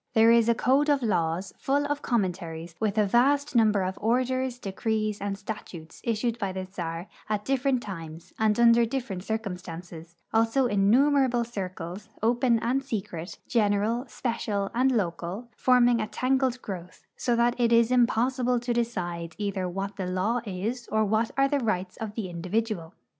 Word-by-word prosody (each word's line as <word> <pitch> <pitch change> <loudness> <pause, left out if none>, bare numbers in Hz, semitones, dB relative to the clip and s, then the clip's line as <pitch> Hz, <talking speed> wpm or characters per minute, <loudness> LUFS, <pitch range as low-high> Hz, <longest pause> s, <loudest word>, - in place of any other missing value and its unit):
There 225 +1 +7
is 235 0 +5
a 235 - +4
code 275 +6 +2
of 285 -3 +2
laws, 175 -3 0
full 285 +2 +1
of 290 0 -2
commentaries, 175 -7 -2
with 215 -1 -1
a 210 - +4
vast 275 +7 +2
num 220 -2 +5
l)er 200 -2 +1
of 185 +1 -3
orders, 255 +2 0
decrees, 215 0 -2
and 200 -1 -2
statutes 195 -6 -8
issued 230 +1 -1
by 195 -4 -2
the 190 0 -4
czar 170 -1 -5 0.2
at 210 -1 -1
differ 270 0 0
ent 255 -3 +2
times 165 -4 -8
and 220 0 +2
under 235 0 +6
different 230 -6 -3
circumstances; 180 -5 -6 0.2
also 225 +4 +3
innumerable 245 +4 +3
circulars, 190 -2 -6
open 235 +1 +3
and 260 +3 0
secret, 190 - -5
general, 220 +1 +1
special, 215 -5 -2
and 255 +3 +3
local, 195 +1 -2
forming 245 -2 +4
a 215 - -2
tangled 255 0 0
growth, 180 -3 -8
so 240 - 0
that 235 +1 +3
it 235 -1 +3
is 230 0 +4
impossible 250 +1 +2
to 240 0 -2
decide 175 -8 -2
either 200 -3 -2
what 195 +2 -4
the 190 -2 -3
law 195 +7 0
is 215 +6 -3
or 220 0 +2
what 220 +2 +1
are 275 0 +4
the 285 0 +1
rights 190 -6 -1
of 215 -2 -6
the 220 -5 -3
individual. 180 0 -3
220 Hz, 170 wpm, -27 LUFS, 190-245 Hz, 0.2 s, There